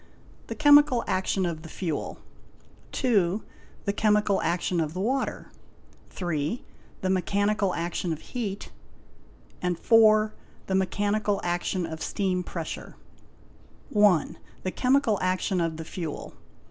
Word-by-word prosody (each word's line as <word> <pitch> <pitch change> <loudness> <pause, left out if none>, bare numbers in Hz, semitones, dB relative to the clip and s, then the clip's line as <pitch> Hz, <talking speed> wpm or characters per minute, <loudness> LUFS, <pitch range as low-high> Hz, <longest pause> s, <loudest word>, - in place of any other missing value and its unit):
The - - -5
chemical 290 -4 +6
action 185 0 0
of 165 -2 -3
the 160 - -10
fuel. 165 -3 -3 0.7
8B. 205 -6 +1 0.4
The 200 - 0
chemical 210 -1 +2
action 175 +1 0
of 155 0 -2
the - - -3
water. 260 +7 -2 0.7
y. 175 +4 -1 0.4
The 185 - 0
mechanical 200 +1 +1
action 170 +1 -2
of 155 - -3
heat. 210 -5 -4 0.9
6. 180 -2 -1
The 215 -2 +7 0.5
mechanical 205 +2 +1
action 175 +1 -1
of 160 -1 -7
steam 185 -2 -1
pressure. 170 -2 -6 1.0
a. 190 -2 +1
Chemical 250 -4 +2
action 185 0 0
of 165 -2 -1
the 160 - -6
fuel. 160 -3 -6
190 Hz, 115 wpm, -27 LUFS, 175-215 Hz, 1.0 s, The